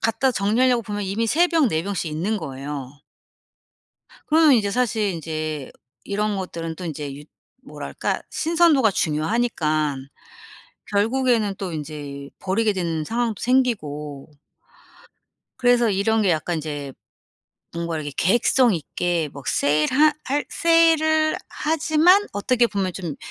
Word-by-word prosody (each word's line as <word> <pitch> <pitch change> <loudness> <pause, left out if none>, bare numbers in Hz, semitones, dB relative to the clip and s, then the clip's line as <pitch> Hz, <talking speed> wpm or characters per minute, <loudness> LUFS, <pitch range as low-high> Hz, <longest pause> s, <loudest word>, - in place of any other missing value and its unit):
갖다 225 +4 +1
정리하려고 235 +4 +2
보면 205 0 -4
이미 200 +4 -1
3 340 +9 +3
병, 325 -4 +3
4 160 -2 -1
병씩 190 -4 -3
있는 185 +8 -1
거예요. 140 -3 -6 1.4
그러면 310 -1 +5
이제 205 -3 +1
사실 230 -2 0
인제 155 -3 -5 0.3
이런 205 0 -1
것들은 165 -3 -5
또 180 - -7
인제 145 -3 -5
유 145 - -11 0.4
뭐랄까 - - -4
신선도가 325 -8 +3
중요하니깐 155 - -1 0.8
결국에는 220 0 +1
또 190 -3 -4
인제 145 -2 -7
버리게 210 +3 +1
되는 165 -4 -2
상황도 230 +1 -2
생기고 155 - -1 1.3
그래서 245 -2 +3
이런 220 +3 +1
게 195 - +3
약간 165 +1 -1
이제 145 -3 -5 0.8
뭔가 170 -1 -3
이렇게 145 -2 -4
계획성 240 +4 +3
있게 170 0 -2
막 140 -1 -10
세일하 155 - +3
할 285 +3 -1
세일을 320 -2 +3
하지만 320 +5 +3
어떻게 235 +4 +2
보면 195 -4 -2
좀 170 -7 -5
200 Hz, 270 characters per minute, -22 LUFS, 155-245 Hz, 1.4 s, 그러면